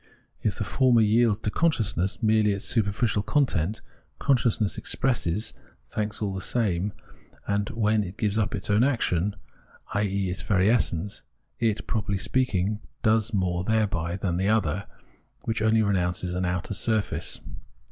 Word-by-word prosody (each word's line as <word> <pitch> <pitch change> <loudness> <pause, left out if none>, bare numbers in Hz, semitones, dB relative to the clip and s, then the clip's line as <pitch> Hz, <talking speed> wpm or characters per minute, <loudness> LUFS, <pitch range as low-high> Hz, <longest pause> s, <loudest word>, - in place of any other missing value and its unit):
If - - 0
the - - -2
former 125 -4 +3
yields 110 0 +3
to 105 - -1
con 165 +8 +3
sciousness 100 - -1
merely 110 -1 +4
its 100 - -5
superficial 105 -1 +1
content, 105 - 0 0.4
consciousness 115 -6 +1
expresses 110 -6 -1 0.4
thanks 105 0 -2
all 100 -2 -1
the 95 - -4
same, 100 -3 +1 0.6
and 100 +1 0
when 110 -1 +1
it 95 +2 -8
gives 105 -1 0
up 105 - 0
its - - -3
own 105 +3 +4
action, 105 -8 +1 0.6
i.e. 100 -2 0
its 90 - -3
very 100 +1 +3
essence, 100 -5 0 0.4
it, 110 -3 0
properly 100 -3 -1
speaking, 105 -3 0 0.2
does 110 0 +3
more 90 -4 0
thereby 100 -6 0
than 90 -3 -1
the 95 +2 +1
other, 100 -3 +1 0.6
which 110 0 -2
only 110 0 +3
renounces 90 -3 0
an 90 +1 -1
outer 90 +2 -2
surface. 110 0 0
105 Hz, 145 wpm, -26 LUFS, 95-110 Hz, 0.6 s, merely